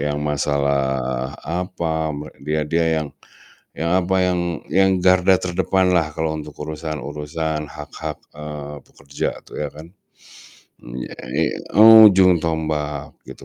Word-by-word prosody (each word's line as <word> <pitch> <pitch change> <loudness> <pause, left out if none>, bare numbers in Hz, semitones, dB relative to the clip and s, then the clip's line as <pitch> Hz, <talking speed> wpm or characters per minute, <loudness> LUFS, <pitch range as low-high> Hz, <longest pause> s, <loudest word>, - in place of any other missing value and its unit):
yang 75 0 -2
masalah, 70 -3 -1
apa, 80 -1 -2
me 75 +1 -7
dia 75 +2 -1
dia 85 +1 +1 0.2
yang 75 - -6 0.7
yang 85 +1 -2
apa, 95 +1 0
yang 90 -1 +1 0.3
yang 95 0 +4
garda 95 +1 +5
terdepanlah 90 -2 +1
kalau 80 -1 -1
untuk 75 -1 -9
urusan-urusan 75 0 -4
hak-hak, 75 +1 -7 0.2
eee, 75 -1 -7
pekerja 70 0 -5 0.2
tuh - - -11
ya 75 - -2
kan. 80 +2 -11 0.9
Mmm, - - -9
iya - - -9
ini - - 0 0.3
ujung 105 -5 +8
tombak 80 -2 -3
gitu - - -11
80 Hz, 125 wpm, -21 LUFS, 75-85 Hz, 0.9 s, ujung